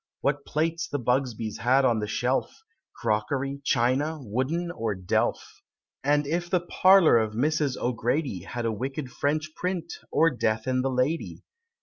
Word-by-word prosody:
What 140 0 -1
plates 165 +3 -1
the 145 - -2
Bugsbys 120 -3 -1
had 130 +3 +3
on 115 -3 +3
the 105 - -3
shelf, 125 - -1 0.3
Crockery, 130 +6 -1
china, 135 +6 +1
wooden, 135 +9 -2
or 115 -10 -2
delf? 90 -1 -1 0.4
And 145 +1 +2
if 170 +4 -2
the 180 -1 +2
parlor 180 -6 +5
of 110 -1 -1
Mrs. 145 +2 +1
O'Grady 125 - -1
Had 120 +5 -5
a 115 - +1
wicked 130 +4 -4
French 155 +2 -1
print, 180 -2 -3 0.2
or 165 0 +4
Death 110 -3 -1
and 130 0 0
the 135 - +1
Lady? 130 +6 -1
135 Hz, 150 wpm, -26 LUFS, 120-155 Hz, 0.4 s, parlor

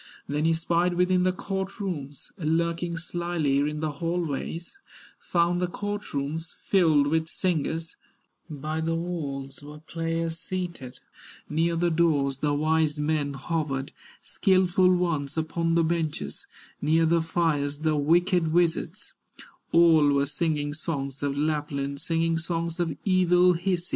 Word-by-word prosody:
Then 150 +2 -1
he 165 - +4
spied 170 +2 +1
within 180 +1 +3
the 185 0 +3
court 190 +1 -4
rooms, 145 -8 -5
Lurking 170 +1 0
slyly 170 -5 -1
in 150 +1 -1
the 155 -1 -1
hall 170 +4 -2
ways, 165 - -5 0.4
Found 175 0 +1
the 180 - +1
court 205 +3 -5
rooms 150 +4 -3
filled 160 -7 +4
with 160 +2 +1
singers, 165 -2 -2 0.5
By 155 +1 -3
the 165 +1 0
walls 145 -6 -4
were 150 +1 -10
players 165 +1 -3
seated, 170 -10 -5 0.5
Near 165 +2 +1
the 170 +1 +1
doors 145 -5 +2
the 145 0 +1
wise 155 0 +1
men 150 -2 0
hovered, 140 -2 -2 0.3
Skilful 185 -2 +3
ones 165 -5 0
upon 165 +1 0
the 170 - +4
benches, 155 - -2 0.3
Near 160 +3 +3
the 165 +1 +3
fires 155 -3 0
the 155 -1 +2
wicked 170 +3 +2
wizards; 170 0 0 0.6
All 165 -3 +6
were 140 0 +2
singing 145 -1 -1
songs 140 -4 -4
of 140 -1 -1
Lapland, 145 -2 -1
Singing 165 0 0
songs 165 0 -2
of 165 -4 -1
evil 180 -1 +4
Hisi. 175 0 -1
165 Hz, 140 wpm, -26 LUFS, 150-175 Hz, 0.6 s, All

